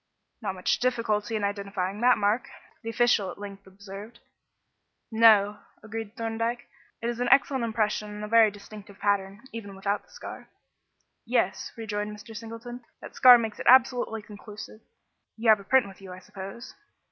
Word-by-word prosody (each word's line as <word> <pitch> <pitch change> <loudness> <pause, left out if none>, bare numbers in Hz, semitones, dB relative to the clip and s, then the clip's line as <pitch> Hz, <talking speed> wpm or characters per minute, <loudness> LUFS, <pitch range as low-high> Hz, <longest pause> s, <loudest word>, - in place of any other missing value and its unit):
"Not 195 -4 -3
much 185 - 0
difficulty 230 -3 0
in 215 - -2
identifying 200 0 -3
that 250 +1 +5
mark," 210 +4 0 0.3
the 230 - -5
official 230 -4 +2
at - - -8
length 200 -1 -9
observed. 200 +4 -11 0.9
"No," 215 -2 +5 0.2
agreed 220 +1 -7
Thorndyke; 230 +1 -3 0.4
"it - - 0
is 240 0 -3
an 245 - 0
excellent 270 -2 +4
impression 215 -2 -1
and 210 0 -7
a - - -4
very 225 0 +6
distinctive 205 0 -12
pattern, 200 0 -1
even 205 -4 -7
without 200 +2 -1
the - - -29
scar." - - -10 0.7
"Yes," - - 0
rejoined 210 -1 -4
Mr. 220 +2 -12
Singleton; 230 +2 -8 0.2
"the - - -11
scar 250 -1 +9
makes 225 -2 -4
it - - -5
absolutely 245 -3 +4
conclusive. 210 +1 -11 0.6
You 225 0 +1
have 215 -1 +7
a - - -11
print 260 +2 +3
with 195 0 -13
you, 190 -1 -10
I 180 - -8
suppose?" 195 +5 -9
215 Hz, 165 wpm, -27 LUFS, 200-230 Hz, 0.9 s, scar